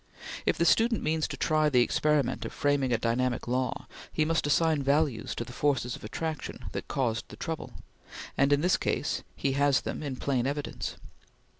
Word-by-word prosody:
If - - +3
the 170 - +2
student 225 +4 +3
means 155 0 +1
to - - -6
try 155 -1 +2
the 125 -4 +5
experiment 150 +2 +1
of - - -5
framing 145 -3 +1
a 115 - +3
dynamic 120 +2 0
law, 125 +1 -1 0.3
he 155 - +1
must 160 -1 +1
assign 155 +1 +3
values 140 -1 +1
to - - -2
the 125 - -10
forces 135 -4 0
of - - -13
attraction 155 +7 -4
that - - -5
caused 120 -4 -1
the - - -9
trouble; 160 -2 -5 0.6
and 140 +1 +3
in 145 0 +4
this 180 +2 +3
case - - -1
he 140 - 0
has 140 0 +3
them - - -4
in 140 -3 -3
plain 130 -1 0
evidence. 145 +1 -3
145 Hz, 185 wpm, -29 LUFS, 130-155 Hz, 0.6 s, the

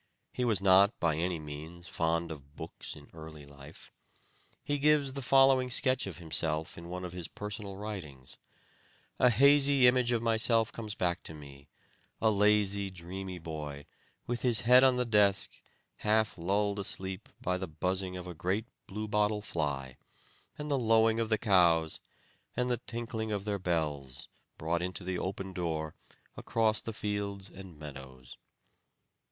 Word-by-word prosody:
He 125 - -2
was 110 -6 +2
not, 100 +3 +5
by 80 -3 +1
any 85 +2 -1
means, 80 +3 -9
fond 85 +1 -1
of 70 -1 -11
books 80 +1 -6
in 75 -1 -15
early 80 -2 -10
life. 70 +1 -14 0.7
He 145 0 -1
gives 145 -2 +3
the 140 - -5
following 135 0 +4
sketch 130 -1 +2
of 95 - -6
himself 80 -2 -1
in 85 0 -10
one 90 +1 -5
of 90 - -7
his 90 -2 -5
personal 105 -1 -5
writings: 85 -11 -7 0.8
'A 125 - +6
hazy 140 +2 +6
image 125 -1 +4
of 115 -1 0
myself 115 0 +2
comes 110 -2 -6
back 90 0 -1
to 80 - -8
me 70 -2 -13 0.5
a 110 - +3
lazy, 100 -1 +2
dreamy 95 +1 -7
boy, 75 -4 -7 0.4
with 120 -1 -3
his 115 -4 +2
head 125 +4 +7
on 130 -1 +5
the 125 - +1
desk, 105 -3 +3 0.5
half 110 0 +1
lulled 100 +4 0
asleep 95 -1 -5
by 90 0 -1
the 95 - -4
buzzing 90 +3 -2
of 90 - -7
a 90 - -6
great 95 +7 -1 0.2
blue 110 +2 -5
bottle 105 0 +1
fly, 70 - -3 0.6
and 150 0 -5
the 140 - +2
lowing 115 -1 +3
of 115 -1 -1
the 110 - +3
cows, 85 -7 +3 0.6
and 125 0 +1
the 120 - +1
tinkling 115 -2 -4
of 100 -1 -2
their 100 -1 -1
bells, 75 -7 -3 0.3
brought 85 +2 -1
into 90 +1 -4
the 90 0 -3
open 95 0 -4
door, 80 -4 -3 0.4
across 110 -1 0
the 115 - -5
fields 100 -3 -3
and 95 -4 -11
meadows.' 65 -4 -10
95 Hz, 160 wpm, -31 LUFS, 80-110 Hz, 0.8 s, head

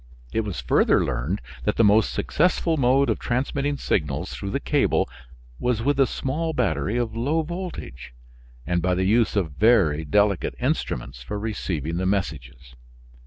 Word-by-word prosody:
It - - +1
was 105 -4 -4
further - - +3
learned 70 +12 -2 0.2
that 105 - 0
the 115 - +3
most 105 +1 +4
successful 165 0 +1
mode 135 0 +3
of - - 0
transmitting 140 +3 -1
signals - - -1
through - - -5
the - - -1
cable - - +1 0.5
was 120 -2 0
with 140 +1 +1
a 135 - +5
small 160 +5 -2
battery 120 -2 0
of 115 -2 -2
low 145 +8 0
voltage, 170 - -7 0.5
and 90 +2 0
by 90 +1 +1
the 95 +1 0
use 110 +3 +2
of 90 -7 0
very 90 -6 +3
delicate 100 +5 +1
instruments - - -2
for 70 +12 -5
receiving 85 -7 -3
the 95 +1 -1
messages. 65 -10 -3
105 Hz, 160 wpm, -24 LUFS, 85-130 Hz, 0.5 s, a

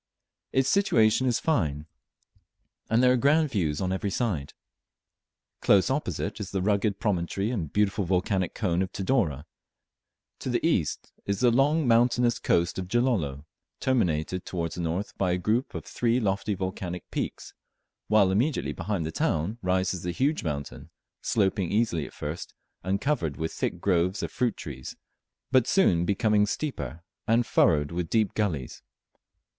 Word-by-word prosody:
Its 135 0 +2
situation 130 - +3
is 120 - +2
fine, 75 - 0 1.0
and 115 +3 +3
there 125 - +6
are - - +4
grand 150 +3 +3
views 80 -8 0
on 95 -1 -1
every 100 +2 -2
side. 95 - -2 1.1
Close 100 +4 +4
opposite 140 -3 -2
is 100 -2 -5
the 95 - -2
rugged 100 0 +1
promontory 100 +1 -1
and 85 - -3
beautiful 105 0 +1
volcanic 95 +1 0
cone 90 -5 0
of 95 - -2
Tidore; 95 - 0 1.0
to - - -4
the 120 +4 0
east 95 - 0 0.2
is 100 -1 -1
the 125 -1 +5
long 145 +4 +3
mountainous 120 0 +3
coast 85 +2 +1
of 90 - -4
Gilolo, 95 - 0 0.3
terminated 90 -8 0
towards 85 -3 -3
the 90 - -4
north 85 +5 -3
by 90 -2 +2
a - - +1
group 110 +8 -1
of - - -5
three 120 +1 +1
lofty 100 -1 -1
volcanic 95 -1 -5
peaks, - - -4 0.5
while 105 -3 +4
immediately 125 +10 0
behind 100 -6 -2
the 80 - -3
town 85 +9 -1
rises 95 -1 0
the 90 - -3
huge 140 - 0
mountain, 70 -4 -5 0.3
sloping 95 -4 +1
easily 105 -9 +1
at - - -14
first 75 +4 -6 0.3
and 95 +2 0
covered 120 - -1
with 80 0 -3
thick 85 - -2
groves 90 +1 +1
of - - -3
fruit 120 -3 0
trees, 65 -6 -7 0.6
but 130 -3 +4
soon 90 - +3
becoming 105 +1 +2
steeper, 85 - -4 0.2
and 115 +2 +3
furrowed 75 -7 +3
with 85 -1 -3
deep 110 -3 +1
gullies. 80 - -2
100 Hz, 155 wpm, -27 LUFS, 85-120 Hz, 1.1 s, there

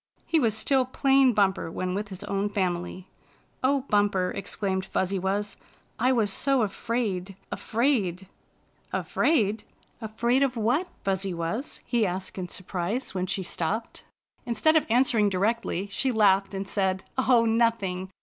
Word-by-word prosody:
He 325 - +2
was 225 -5 +1
still 265 +3 +2
plain 270 +1 +3
Bumper 195 -6 +1
when 180 +2 -3
with 205 +2 -3
his 195 0 -7
own 200 0 -1
family. 180 -2 -2 0.3
" - - -35
O 275 +1 +3
Bumper," 205 -6 +1
exclaimed 195 -1 -2
Fuzzy 190 0 -1
Wuzz, 200 +3 -2 0.2
" - - -37
I 250 +3 +3
was 220 -6 +2
so 270 0 +2
afraid 200 -3 -2
— - - -37
afraid 215 -7 0 0.2
— - - -39
" - - -39
" - - -37
Afraidl 220 -8 +1 0.4
Afraid 235 +4 +1
of 265 -3 +1
what. 250 +12 +1
Fuzzy 195 -2 -1
Wuzz?" 170 - -4
he 235 -4 +1
asked 185 +1 -5
in 180 - -4
surprise 185 +7 -3
when 185 -1 -2
she 195 0 -2
stopped. 195 +7 -3 0.4
Instead 245 +7 +2
of 315 - +3
answering 230 -3 +3
directly, 200 0 0
she 265 +5 0
laughed, 200 -3 +3
and 195 0 -4
said: 190 -2 0
" - - -36
Oh, 235 -2 +6
nothing! 225 -5 +1
205 Hz, 165 wpm, -26 LUFS, 190-240 Hz, 0.4 s, Oh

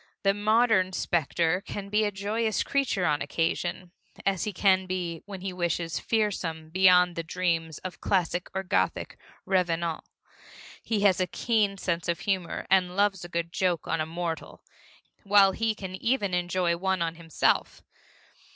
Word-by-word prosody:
The 195 0 +4
modern 210 -2 +3
specter 170 +1 0
can 200 -1 -6
be 210 +1 +2
a 205 - 0
joyous 210 +2 -1
creature 260 -9 0
on 150 -2 +1
occasion, 170 +4 -2 0.3
as 195 -2 +1
he 210 - -2
can 190 -1 +2
be, 175 -3 -3
when 195 -2 -7
he 190 0 -4
wishes, 170 -2 -1
fearsome 175 -8 -1
beyond 180 -1 +5
the 165 - -2
dreams 165 -2 -1
of 185 - -6
classic 180 -1 0
or 190 - -1
Gothic 95 - -1 0.3
revenant. 170 -3 0 0.8
He 215 -3 -1
has 195 -3 +4
a 185 - +1
keen 210 0 0
sense 170 -2 -2
of 170 +2 -1
humor 190 -4 -2
and 180 -1 +2
loves 200 -2 +1
a 175 - -8
good 170 0 -3
joke 180 -4 0
on 160 - 0
a 155 - -2
mortal, 165 0 -5 0.6
while 200 -1 +6
he 225 +2 -1
can 190 -3 -7
even 205 -1 0
enjoy 180 -1 +1
one 190 -1 0
on 165 -1 -2
himself. 165 -2 0
185 Hz, 160 wpm, -27 LUFS, 170-200 Hz, 0.8 s, while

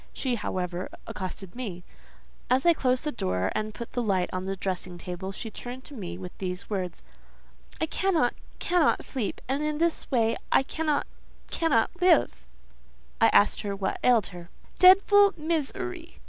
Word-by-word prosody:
She, 260 -2 -1
however, 185 -5 -3 0.2
accosted 190 -1 -6
me. 200 -9 -5 0.7
As 255 +4 +3
I 340 - +7
closed 255 -4 +1
the 300 - -1
door, 90 - -1
and 215 0 -2
put 235 - -7
the 245 - 0
light 190 -5 0
on 185 0 -3
the 195 0 -2
dressing 185 -2 -4
table, 180 +2 -5
she 220 +3 -6
turned 250 +3 -8
to 290 - -12
me 180 -8 -6
with 180 -1 -8
these 180 +1 -5
words:—"I 185 - -7
cannot—cannot 340 0 +1
sleep; 245 -7 -3
and 270 +3 0
in 300 0 -1
this 335 +1 0
way 230 -4 +2
I - - +5
cannot—cannot 300 -3 -1
live!" 360 -1 +3 0.7
I 225 - +8
asked 205 - +4
what 200 -1 -2
ailed 235 -5 +4
her. 175 -1 -10 0.3
"Dedful 400 +2 +7
miz 315 -2 0
er 365 -1 -3
y!" 335 -1 -12
235 Hz, 155 wpm, -27 LUFS, 185-305 Hz, 0.7 s, I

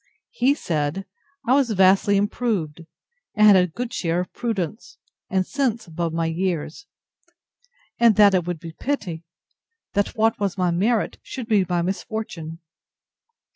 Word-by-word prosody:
He 265 +4 +2
said, 160 - -2 0.4
I 245 - +3
was 270 -3 +3
vastly 195 0 +4
improved, 200 -7 -2 0.5
and 215 - +5
had 205 -2 +8
a 180 -1 +4
good 235 +8 -6
share 170 0 -1
of 180 - -8
prudence, 220 -4 -4 0.3
and 190 -3 +1
sense 245 -4 -1
above 170 -1 -3
my 165 0 -1
years; 165 - -3 1.1
and 230 -3 +5
that 205 -2 +6
it 180 -2 +1
would 175 -2 -3
be 165 0 -8
pity, 185 - -3 0.7
that 205 +3 0
what 225 0 +2
was 200 -2 -1
my 180 -2 +1
merit 210 +6 0
should 255 - -7
be 205 -5 +2
my 175 -1 +1
misfortune. 180 -4 -4
195 Hz, 145 wpm, -23 LUFS, 170-220 Hz, 1.1 s, had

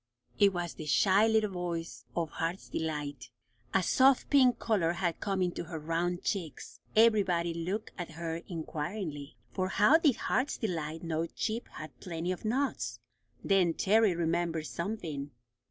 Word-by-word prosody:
It 200 -1 +6
was 175 -2 -3
the 155 - -8
shy 200 +7 +4
little 220 -2 +2
voice 175 -2 -4
of 165 -3 -1
Heart's 170 +3 -3
Delight. 145 -6 -4 0.4
A 190 - +2
soft 265 +8 +4
pink 255 -4 +5
colour 190 -9 +1
had 175 -2 -1
come 195 -3 0
into 175 -1 -2
her 165 0 -6
round 170 +3 -1
cheeks. 175 -8 -4 0.2
Everybody 195 -7 +4
looked 185 +6 -3
at 170 -2 -5
her 165 0 -3
inquiringly, 160 -2 -5 0.2
for 185 -1 0
how 210 +11 +5
did 295 -7 +4
Heart's 260 +3 0
Delight 165 -6 -3
know 165 0 -1
Chip 225 +6 -3
had 155 -1 -9
plenty 170 0 -3
of 185 - -5
nuts? 215 - -1 0.5
Then 180 -4 +3
Terry 210 -2 +3
remembered 165 -1 0
something. 170 -7 -4
175 Hz, 150 wpm, -31 LUFS, 165-205 Hz, 0.5 s, It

